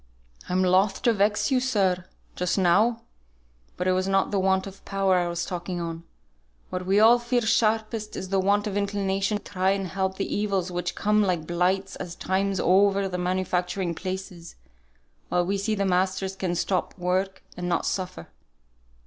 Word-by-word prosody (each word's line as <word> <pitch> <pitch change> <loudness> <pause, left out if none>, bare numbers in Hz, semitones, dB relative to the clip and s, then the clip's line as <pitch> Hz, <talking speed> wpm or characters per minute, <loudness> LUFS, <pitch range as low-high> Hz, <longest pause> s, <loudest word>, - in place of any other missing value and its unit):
"I'm 185 +1 +2
loth 190 +3 +2
to 235 -2 +4
vex 205 +5 +1
you, 260 - +4
sir, 195 -8 +1 0.3
just 180 +2 -1
now; 210 +6 +3 0.7
but 180 - -2
it - - +4
was 185 +1 0
not 195 0 +1
the 200 - +1
want 190 0 +2
of 195 -1 -11
power 195 -2 +1
I 175 - 0
was 170 +1 -2
talking 180 0 -4
on; 165 0 -5 0.7
what 180 0 -4
we 195 +2 +4
all 230 +3 +7
feel 240 0 0
sharpest 220 -1 0
is 190 - -5
the 195 0 +1
want 200 +2 +2
of 205 -2 -3
inclination 200 0 0
to - - -13
try 190 -1 0
and 195 0 0
help 190 0 -2
the 195 - -2
evils 195 -3 -1
which 175 0 -3
come 210 +1 +2
like 180 -6 0
blights 185 +3 0
at 175 -2 -7
times 195 +1 0
over 195 +1 +3
the 180 -1 -4
manufacturing 180 0 -1
places, 185 -1 -6 0.7
while 175 0 +1
we 195 +2 -1
see 215 +2 0
the 200 -1 0
masters 190 +1 0
can 185 -2 -2
stop 185 +1 -1
work 185 +2 -1
and 180 0 -4
not 175 - 0
suffer. 185 - -4
190 Hz, 180 wpm, -25 LUFS, 180-200 Hz, 0.7 s, all